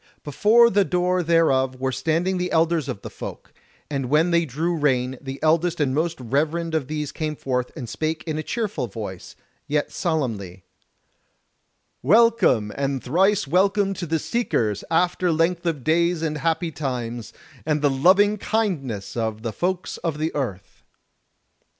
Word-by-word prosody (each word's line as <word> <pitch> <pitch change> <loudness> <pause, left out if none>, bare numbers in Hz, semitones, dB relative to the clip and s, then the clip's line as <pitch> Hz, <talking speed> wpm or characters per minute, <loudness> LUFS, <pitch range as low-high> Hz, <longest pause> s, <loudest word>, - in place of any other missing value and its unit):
Before 225 +10 +4
the 200 +1 +4
door 180 0 +1
thereof 155 -6 +2
were 130 0 -1
standing 165 +8 0
the 180 0 -2
elders 165 -2 +2
of 100 - -5
the - - -6
Folk; - - -9 0.3
and 135 -4 -3
when 160 +5 +3
they 170 0 +3
drew 160 +6 -1
rein, 130 -4 +1
the 135 0 -6
eldest 165 +2 +2
and 140 -3 +1
most 165 +2 -1
reverend 155 +7 -1
of 155 -5 0
these 150 -1 -3
came 155 -1 -3
forth 125 -3 -2
and 120 - -5
spake 155 +6 -3
in 155 -2 -2
a - - -1
cheerful 205 - -3
voice, 100 -3 -8 0.3
yet 150 0 0
solemnly: 110 - -2 1.4
"Welcome 200 - +4
and 135 -1 -2
thrice 190 +8 +2
welcome 195 +5 +2
to 175 -2 -5
the 160 +1 +1
Seekers 115 - -1
after 180 +1 +2
length 170 +2 +1
of 150 -6 -2
days 170 +2 +2
and 155 -1 -2
happy 165 +2 0
times, 120 -6 -4 0.3
and 150 +4 0
the 145 - +4
loving 195 +9 +4
kindness 150 - -2
of 110 -2 -2
the 115 -2 -3
Folks 180 - -2
of 160 -3 -3
the 155 +2 -2
Earth!" 100 -9 -5
155 Hz, 155 wpm, -23 LUFS, 130-175 Hz, 1.4 s, Before